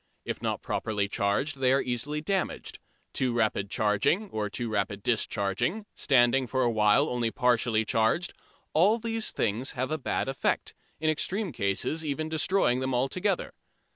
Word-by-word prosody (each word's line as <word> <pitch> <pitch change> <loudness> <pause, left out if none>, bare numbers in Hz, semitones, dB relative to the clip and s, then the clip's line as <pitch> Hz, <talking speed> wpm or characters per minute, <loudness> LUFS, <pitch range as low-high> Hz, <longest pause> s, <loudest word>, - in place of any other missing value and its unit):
If - - -4
not - - -2
properly 105 -2 -1
charged 105 +9 0
they 130 -1 +3
are 135 - +4
easily 135 +5 -2
damaged. 190 +3 -2 0.3
Too 125 -2 0
rapid 110 -4 0
charging 110 - +1
or 105 -1 -2
too 120 +4 -3
rapid 100 -2 -2
discharging, 110 - 0
standing 130 0 +3
for 130 +1 0
a 120 - +2
while 110 +6 +4
only 120 -4 0
partly 120 -3 +2
charged 115 +12 +1 0.4
all 195 +8 +4
these 225 -1 -2
things 115 +5 -1
have 130 +1 -2
a 155 - -1
bad 130 - -1
effect, 135 0 -1 0.3
in 155 0 +2
extreme 190 +5 -2
cases 100 +11 -1
even 155 +1 -2
destroying 160 -4 +2
them 130 -1 -1
altogether. 180 +10 0
130 Hz, 155 wpm, -28 LUFS, 110-155 Hz, 0.4 s, are